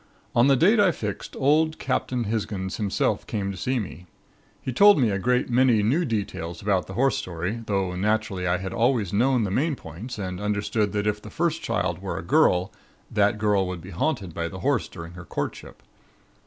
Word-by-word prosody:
On 120 +3 +5
the 140 - +5
date 200 - +4
I 195 -3 +5
fixed 105 - -5
old 155 +3 +2
Captain 130 -2 -1
Hisgins 100 -3 -3
himself 105 -3 0
came 100 -3 -2
up - - -2
to - - -9
see 130 +7 -1
me. 95 -4 -6 0.5
He 130 - -4
told 205 - +7
me 120 -5 +3
a 100 - -1
great 125 +4 +1
many 120 -3 +3
new 145 +12 +2
details 100 - -3
about 100 -3 0
the 95 - -8
horse 135 +4 +2
story; 90 +6 -4
though 95 -3 0
naturally 105 -1 0
I 90 +1 +2
had 95 +3 -5
always 115 -5 +1
known 125 +3 +3
the 100 - -2
main 145 +8 +1
points 100 - -8
and 90 -2 -4
understood 105 0 0
that 105 0 -1
if 105 0 0
the - - -10
first - - -1
child - - -1
were - - -4
a - - -5
girl, 90 +1 +3 0.4
that 105 0 +2
girl 105 -3 +2
would 90 -2 -5
be 95 - -10
haunted 95 - -2
by 85 0 -2
the 95 +2 -8
Horse 140 -4 +1
during 85 -1 -9
her 90 0 -9
courtship. - - -6
105 Hz, 205 wpm, -25 LUFS, 95-125 Hz, 0.5 s, told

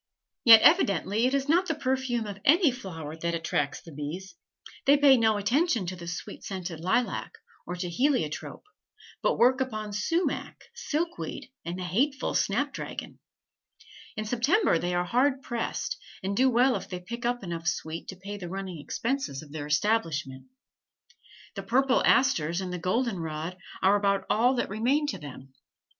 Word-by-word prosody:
Yet 225 -2 +9
evidently 225 - +4
it 265 - 0
is 275 0 -1
not 350 +4 +3
the 320 - 0
perfume 260 -4 -1
of 205 -1 -7
any 320 0 +5
flower 165 - -7
that 170 +1 -2
attracts 145 -3 -1
the 165 - -12
bees; 155 +6 -6 0.5
they 285 +1 +7
pay 280 -2 +7
no 220 -3 +3
attention 235 - +1
to 185 +1 -4
the 170 -1 -9
sweet 175 - -6
scented 180 -4 -5
lilac, 190 +8 -1 0.3
or 180 - -3
to 180 0 -4
heliotrope, 175 - -1 0.6
but - - +1
work 260 +2 +4
upon 215 -5 -3
sumach, 330 - -1 0.2
silkweed, 325 - -4
and 170 +2 -5
the 185 - -4
hateful 260 - 0
snapdragon. 270 +8 -2 1.0
In 215 - -2
September 245 - +2
they 175 +1 -1
are 175 0 +1
hard 260 +6 +1
pressed, 240 - -3 0.3
and 195 +1 -1
do 260 +4 +4
well 250 +2 +3
if - - -5
they 180 -2 -4
pick 235 +7 -7
up 245 -1 -1
enough 170 -2 -5
sweet 160 -1 -3
to 190 - -6
pay 200 +3 -7
the 180 -3 -7
running 190 -3 -5
expenses 230 - -3
of 145 - -15
their 145 -1 -5
establishment. 150 -6 0 1.1
The 195 - -5
purple 255 +6 +2
asters 170 - +3
and 185 -1 -4
the 180 - -3
golden 215 +5 0
rod 160 +2 -4 0.3
are 195 +2 +5
about 200 -1 +1
all 245 +4 +3
that 240 - -1
remain 250 +9 +1
to 195 - -4
them. 135 -2 -11
205 Hz, 165 wpm, -28 LUFS, 175-260 Hz, 1.1 s, Yet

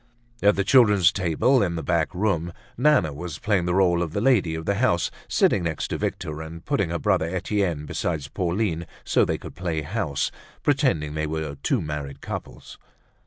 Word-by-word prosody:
At 100 0 +5
the 100 - +1
children's 105 -6 +5
table 95 - +2
in 85 -4 0
the 80 - -4
back 85 0 0
room, 90 -4 0 0.2
Nana 130 - +3
was 80 +1 -6
playing 100 -5 +1
the 90 0 0
role 90 -3 +3
of 85 -3 -3
lady 100 -7 +2
of 80 0 -5
the 100 - +1
house, 105 -9 +2 0.2
sitting 100 - +3
next 85 -2 -2
to - - -2
Victor 75 0 -3
and 80 +1 -9
putting 100 - 0
her 85 - -1
brother 95 -4 +1
Etienne 90 -3 -1
beside 75 -1 -3
Pauline 90 -2 -1 0.2
so - - +3
they - - -1
could - - -10
play 85 -4 -2
house, 80 -5 -2 0.3
pretending 75 -2 +1
they 80 0 -2
were 80 -1 -3
two - - 0
married 75 -2 -5
couples. - - -8
85 Hz, 180 wpm, -24 LUFS, 80-100 Hz, 0.3 s, At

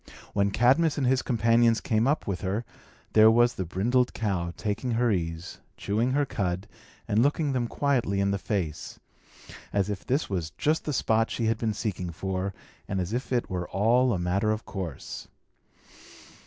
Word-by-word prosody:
When 100 0 +2
Cadmus 135 +9 +3
and 140 - +1
his 130 +1 +3
companions 115 -1 +3
came 110 +2 +1
up 150 +3 +1
with 95 -3 -3
her, 100 +5 -2 0.5
there 110 0 +8
was 120 +2 +4
the 95 - -4
brindled 120 +9 +1
cow 95 -6 -1
taking 110 +3 -2
her 120 0 +2
ease, 85 -1 -3 0.2
chewing 115 +6 0
her 145 +1 +2
cud, 95 -5 -2 0.4
and 105 +1 +2
looking 145 +2 +2
them 125 -2 0
quietly 120 -8 0
in 100 0 +2
the 100 - -1
face; 90 -7 -3 0.7
as 100 0 0
if 100 - -5
this 135 +5 0
was 90 -5 -2
just 155 +2 +1
the 150 - -1
spot 115 -2 +2
she 115 - -2
had 110 0 +1
been 110 -2 -1
seeking 95 -5 -3
for, 95 +3 -3 0.4
and 95 - -2
as 90 +3 -3
if 125 +2 -3
it 120 -2 +1
were 90 -1 -4
all 120 +5 +3
a 100 - +1
matter 90 +5 0
of 110 0 -1
course. 90 -8 -6
110 Hz, 180 wpm, -27 LUFS, 95-120 Hz, 0.7 s, there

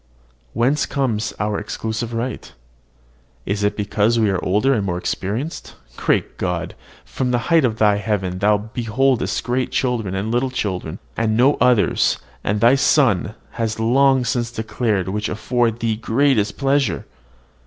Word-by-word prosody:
Whence 130 +5 +1
comes 115 -6 -1
our 105 0 -1
exclusive 110 +2 -4
right? 120 +2 -4 0.9
Is 100 +1 -2
it 105 - 0
because 105 +2 +1
we 110 -3 +3
are 95 - -2
older 105 +9 +2
and 110 -5 0
more 90 -3 -2
experienced? 110 - -4 0.2
Great - - -1
God! 90 -1 -2 0.3
from 130 -1 -2
the 125 - +2 0.2
height 165 -2 +6
of 115 -4 0
thy 105 -2 +3
heaven 95 -3 -2
thou 105 +1 +3
beholdest 115 +4 -1
great 125 +1 -1
children 115 -7 -1
and 100 +4 -2
little 125 +2 +1
children, 95 -8 -3 0.2
and 110 -1 0
no 130 +4 +5
others; 125 -4 +3 0.3
and 105 +1 0
thy 120 +2 +6
Son 125 - +2 0.2
has 110 -1 -3
long 130 +3 +3
since 120 -1 -1
declared 110 -4 -1
which 105 +3 -2
afford 120 0 0
thee 115 -2 0
greatest 115 -2 +1
pleasure. 135 -8 +1
110 Hz, 150 wpm, -20 LUFS, 105-125 Hz, 0.9 s, height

